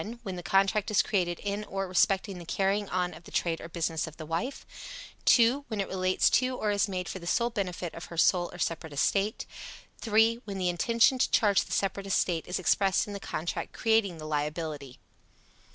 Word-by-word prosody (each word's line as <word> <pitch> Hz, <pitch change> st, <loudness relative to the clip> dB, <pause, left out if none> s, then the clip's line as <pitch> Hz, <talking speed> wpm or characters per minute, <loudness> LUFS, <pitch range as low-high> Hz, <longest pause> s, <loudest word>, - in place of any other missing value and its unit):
When 190 Hz, -4 st, -5 dB
the 175 Hz, -, -6 dB
contract 195 Hz, +3 st, +2 dB
is 215 Hz, -, +3 dB
created 175 Hz, -4 st, 0 dB
in 205 Hz, +1 st, -3 dB
or 195 Hz, -1 st, -3 dB
respecting 190 Hz, +1 st, +1 dB
the -, -, -8 dB
carrying 195 Hz, +2 st, 0 dB
on 180 Hz, -1 st, -1 dB
of 170 Hz, -, -13 dB
the -, -, -11 dB
trade 165 Hz, -2 st, -1 dB
or -, -, -8 dB
business 165 Hz, -2 st, -2 dB
of 160 Hz, -, -11 dB
the 155 Hz, -, -7 dB
wife. 170 Hz, -, -3 dB, 0.6 s
2. 250 Hz, +4 st, +5 dB
When 220 Hz, -3 st, -4 dB
it 195 Hz, -, -1 dB
relates 185 Hz, 0 st, +1 dB
to 255 Hz, 0 st, -2 dB
or 210 Hz, -, 0 dB
is 205 Hz, +1 st, +2 dB
made 185 Hz, -2 st, -3 dB
for 190 Hz, -, -5 dB
the 170 Hz, -, -9 dB
sole 235 Hz, +5 st, +1 dB
benefit 180 Hz, -5 st, -3 dB
of 165 Hz, -, -8 dB
her 170 Hz, -, -10 dB
sole 175 Hz, +1 st, +3 dB
or -, -, -10 dB
separate 160 Hz, -2 st, -3 dB
estate. 200 Hz, +9 st, 0 dB, 0.5 s
3. 225 Hz, +1 st, +3 dB
When 200 Hz, -2 st, -5 dB
the 180 Hz, -1 st, 0 dB
intention 230 Hz, +8 st, +3 dB
to -, -, +3 dB
charge 205 Hz, -4 st, +4 dB
the -, -, -13 dB
separate 195 Hz, 0 st, -1 dB
estate 175 Hz, -3 st, 0 dB
is 180 Hz, -, -2 dB
expressed 195 Hz, +2 st, +2 dB
in 205 Hz, -, -7 dB
the 200 Hz, -, -5 dB
contract 170 Hz, -3 st, -4 dB
creating 220 Hz, -6 st, +1 dB
the 155 Hz, -, -8 dB
liability. 150 Hz, -2 st, -3 dB
190 Hz, 205 wpm, -29 LUFS, 170-210 Hz, 0.6 s, 2